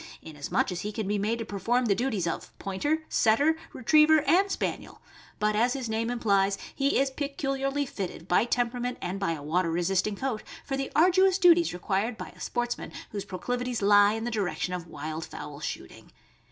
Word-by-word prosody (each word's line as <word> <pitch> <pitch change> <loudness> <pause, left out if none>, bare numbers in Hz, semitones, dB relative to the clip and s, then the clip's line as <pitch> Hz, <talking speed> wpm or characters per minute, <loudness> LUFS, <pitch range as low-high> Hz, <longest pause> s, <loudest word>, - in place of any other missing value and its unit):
293 160 - -9
inasmuch 145 +4 -1
as 175 -1 -4
he 210 - -3
can 215 -2 -4
be 205 0 0
made 215 +3 0
to 230 - -4
perform 230 +6 0
the 210 - +3
duties 215 -4 -1
of 165 - -5
Pointer, 290 +12 -1
Setter, 280 +9 +3 0.2
Retriever, 305 +5 +5
and 360 +7 +3
Spaniel; - - -3 0.4
but, 210 0 +1
as 240 +3 +3
his 265 -4 -4
name 225 +1 -1
implies, 200 -5 +2 0.2
he 275 0 +1
is 270 0 +2
peculiarly 275 0 -2
fitted 185 -8 -6
by 180 +5 +3
temperament 245 +1 -1
and 185 +2 -4
by 195 -4 0
a 150 -3 -7
water 165 +3 +1
resisting 185 +5 0
coat 235 -1 -3 0.2
for 270 - -2
the 270 0 -3
arduous 370 +3 +5
duties 345 -3 +5
required 195 +6 -1
by - - -7
a - - -18
sportsman 240 0 -3 0.2
whose 200 -2 -4
proclivities 245 +4 -3
lie 205 0 +6
in 225 0 -3
the 240 - -2
direction 190 -4 -2
of 175 -2 -5
wild 155 +1 -5
fowl 145 -2 -8
shooting. 150 - -7
225 Hz, 190 wpm, -28 LUFS, 195-270 Hz, 0.4 s, lie